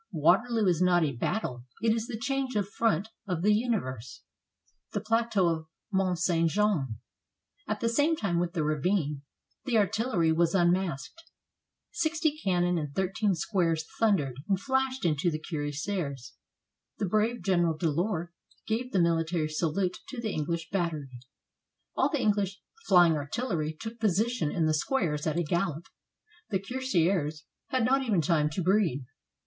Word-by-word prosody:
Waterloo 200 +8 +3
is 180 -2 +2
not 175 -2 +4
a 150 - +1
battle; 125 - -3
it 225 +1 +3
is 225 0 -2
the 240 -4 -4
change 265 +1 -2
of 205 -2 +1
front 210 -2 0 0.2
of 180 -3 -2
the 210 +1 +5
universe. 185 - -2 0.7
THE - - 0
PLATEAU 220 -3 +1
OF 160 -1 -1 0.3
MONT 190 -2 +1
ST. 165 -1 +2
JEAN 165 - +1 0.7
At 215 0 -2
the 230 - +1
same 290 +8 +2
time 175 - -1
with 175 -1 -1
the 160 - 0
ravine, 150 -1 0 0.4
the 245 -4 +2
artillery 210 -5 +2
was 165 +2 +2
unmasked. 175 - 0 0.7
Sixty 320 -2 0
cannon 175 -2 +2
and 150 -2 -5
thirteen 190 +1 +1
squares 165 -3 0
thundered 165 - +2
and 195 -2 +2
flashed 265 0 0
into 165 +1 +2
the 155 - -2
cuirassiers. 145 -2 -4 0.6
The - - -1
brave 215 +3 0
General 175 -4 +2
Delord 170 +2 -1 0.4
gave 240 +3 -2
the - - +2
mihtary 165 -2 +1
salute 180 +4 -1
to 265 - -7
the 220 -3 -3
Enghsh 165 +2 -2
battery. 165 -7 -1 0.9
All - - +2
the 295 - -1
English 200 -3 +1 0.3
flying 175 -4 +6
artillery 155 - -2
took 225 +1 -7
position 215 -3 +1
in 165 - +1
the 155 - +2
squares 155 - 0
at 155 +1 0
a 175 - +2
gallop. 170 0 -1 0.6
The 200 - +1
cuirassiers 185 - 0 0.2
had 255 -3 +1
not 270 +2 +3
even 215 -10 +1
time 150 -1 +2
to 180 - -2
breathe. 180 -8 +2
180 Hz, 155 wpm, -29 LUFS, 160-220 Hz, 0.9 s, flying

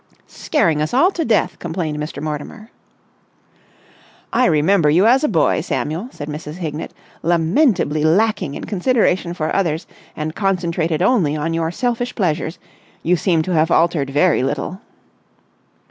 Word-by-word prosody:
"Scaring 165 - 0
us 155 +10 -1
all 345 +9 +4
to 340 - -2
death!" 225 -5 +1
complained 160 -3 -3
Mr. 150 0 -5
Mortimer. 155 +9 -6 1.6
"I 250 +2 +3
remember 160 +1 +3
you 175 +7 +4
as 255 +5 +4
a - - +3
boy, 165 -7 +2
Samuel," 165 +10 -3
said 145 - -8
Mrs. 150 0 -6
Hignett, 160 -3 -5 0.3
"lamentably 170 - +2
lacking 170 -3 +1
in - - -6
consideration 190 -4 0
for 155 -2 -2
others 165 -4 0 0.3
and 155 +1 -4
concentrated 175 -4 -1
only 190 - +2
on 160 +2 -2
your 165 0 0
selfish 245 +5 -2
pleasures. 165 -4 -1 0.5
You 175 +2 +3
seem 165 -1 +1
to 185 - -2
have 160 0 +2
altered 165 -5 +2
very 150 +3 +2
little." 145 - -3
170 Hz, 145 wpm, -19 LUFS, 155-200 Hz, 1.6 s, all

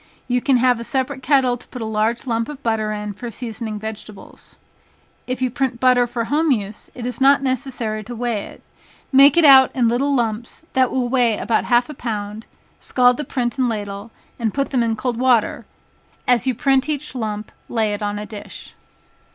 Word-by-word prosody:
You 245 -1 +1
can 270 -1 +3
have 250 -1 +3
a - - -5
separate 265 +2 -2
kettle 260 -3 +2
to - - -16
put 250 - -9
a 225 - -4
large 220 +3 -1
lump 230 -1 -1
of 290 -2 -9
butter 220 -2 0
in 210 -1 -4
for 240 +4 -7
seasoning 225 -2 -5
vegetables. 215 -1 -10 0.7
If 255 0 -2
you 255 - 0
print 255 -1 -2
butter 250 -1 +4
for 240 -1 -3
home 305 +7 +1
use, 210 -5 -2
it 240 - -6
is 250 +1 -4
not 275 +1 +5
necessary 250 -5 -2
to 240 +2 -7
weigh 235 -3 -2
it, - - -14 0.5
make 275 +3 +7
it 335 - +6
out 265 -2 +8
in 245 -3 +3
little 275 +5 +1
lumps 235 +4 -3
that 260 -1 +3
will 255 -2 -1
weigh 240 -4 +2
about 225 - 0
half 240 0 +3
a 300 - -7
pound, 215 -4 -5 0.3
scald 250 -1 +3
the 300 - -3
print 250 -1 -3
and 255 -2 +2
ladle, 205 -1 -5 0.3
and 225 -3 -1
put 275 0 -1
them 255 -3 +2
in 230 -1 +1
cold 240 +1 -2
water, 250 -3 +2 0.6
as 245 +1 +3
you 255 - +1
print 270 +3 +2
each 300 0 -3
lump, 215 -4 -4 0.2
lay 220 -3 0
it 205 - -5
on 205 0 -2
a 210 - -5
dish. 210 -1 -9
240 Hz, 200 wpm, -20 LUFS, 220-260 Hz, 0.7 s, out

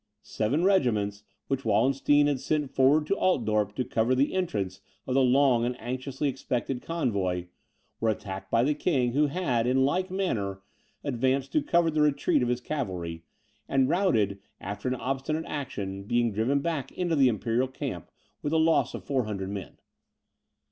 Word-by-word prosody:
Seven 130 +10 -1
regiments, 110 - +2 0.3
which 135 -1 -1
Wallenstein 140 +4 +3
had 145 -2 +1
sent 145 0 -1
forward 140 +4 +4
to 195 - +1
Altdorp 110 - +1
to 130 - -1
cover 115 +3 +1
the 135 +3 +1
entrance 105 - -2 0.2
of 130 - -2
the 135 - +4
long 130 -2 +4
and 125 +1 -2
anxiously 130 +4 -3
expected 130 -1 -2
convoy, 95 - -1 0.5
were 115 - +1
attacked 95 -2 -4
by 115 +1 +3
the 150 +4 +2
King, 140 -5 +1
who 150 +2 +3
had, 135 -7 0
in 130 +1 +3
like 185 +7 0
manner, 105 - -2 0.4
advanced 135 +1 0
to 155 - +2
cover 170 +2 +2
the 155 0 +1
retreat 145 -3 +2
of 120 - +1
his 125 0 -1
cavalry, 90 - -4 0.4
and 135 -1 +3
routed 110 - +2 0.2
after 100 +5 -5
an 130 - 0
obstinate 135 +5 -2
action, 100 -9 -5
being 120 +1 +1
driven 120 +7 +1
back 160 -4 -2
into 175 -2 0
the 135 -3 +5
Imperial 115 +2 0
camp, 130 - -6 0.3
with 145 - -2
the 160 - +2
loss 160 0 +2
of - - -7
400 105 -8 -2
men. 100 -4 -7
130 Hz, 165 wpm, -27 LUFS, 110-145 Hz, 0.5 s, the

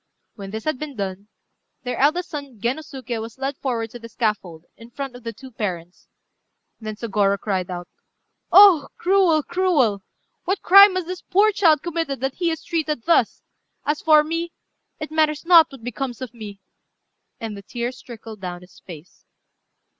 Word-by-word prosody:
When 195 -3 -9
this 220 +2 -6
had 310 -5 -2
been 300 -3 -6
done, 200 -1 -5 0.6
their 250 - -3
eldest 340 +6 +2
son 280 -7 -8
Gennosuké 255 -1 -4
was 225 +2 -9
led 270 +2 -3
forward 230 -4 -3
to 240 - -9
the 230 0 -11
scaffold, 200 -8 -3
in 230 0 -14
front 270 +1 -6
of 245 - -12
the 230 - -4
two 260 +4 -13
parents. 180 -6 -6 0.7
Then 215 -1 -6
Sôgorô 205 -3 0
cried 190 -3 -2
out 175 -1 -6 0.6
"Oh! 375 -8 +8
cruel, 360 -5 +3
cruel! 285 - +1 0.4
what 380 +2 -2
crime 395 +1 +8
has 370 -2 -2
this 365 +1 -6
poor 410 +3 +3
child 325 -8 +3
committed 330 -5 -3
that 270 0 -1
he 345 -2 -1
is 320 -2 -4
treated 310 -7 -2
thus? 335 - +2 0.4
As 295 +1 -1
for 305 -1 +5
me, 330 +2 -3 0.5
it 305 0 -6
matters 310 0 +1
not 335 -2 +7
what 265 -4 -13
becomes 245 0 -5
of 255 -2 -7
me." 210 -4 -9 0.8
And 220 -2 -5
the 200 - -9
tears 240 +4 -5
trickled 225 -4 -11
down 180 -1 -6
his 180 0 -17
face. 165 -1 -14
260 Hz, 170 wpm, -22 LUFS, 215-315 Hz, 0.8 s, Oh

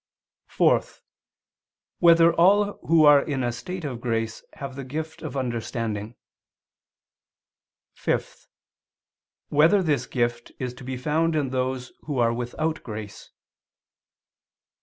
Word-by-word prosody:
(4) - - +3 1.2
Whether 170 -1 +6
all 200 +4 +3
who 160 -1 +5
are 145 -1 +8
in 140 -4 -2
a 120 - 0
state 180 +8 -6
of 125 -5 -5
grace 115 -2 -2
have 140 -2 -7
the 135 - -6
gift 155 +5 -6
of 155 -3 -5
understanding? 115 -3 -3 1.8
(5) - - -3 1.0
Whether 165 +7 +4
this 150 -4 0
gift 120 -1 -2
is 125 -2 -4
to 125 - -13
be 130 0 -4
found 155 +5 0
in 140 -4 0
those 130 0 -2
who 145 -3 -3
are 115 -1 +3
without 125 +7 -3
grace? 105 -3 -8
135 Hz, 115 wpm, -25 LUFS, 120-160 Hz, 1.8 s, are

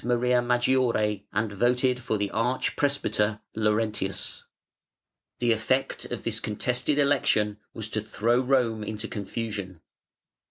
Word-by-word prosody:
Maria 125 +1 +2
Maggiore 120 -4 +1
and 105 +1 0
voted 125 +4 +2
for 115 -3 -1
the 100 -1 -2
arch 125 +3 0
presbyter 110 -7 +1 0.2
Laurentius. 105 -2 -1 0.9
The 120 -1 +2
effect 115 +4 0
of - - -5
this - - -1
contested 125 +6 -1
election 115 -7 +2 0.2
was 110 -1 -4
to 110 - 0
throw 115 +3 +1
Rome 125 -4 +1
into 110 +1 -4
confusion. 105 -4 -5
115 Hz, 120 wpm, -27 LUFS, 105-125 Hz, 0.9 s, Maria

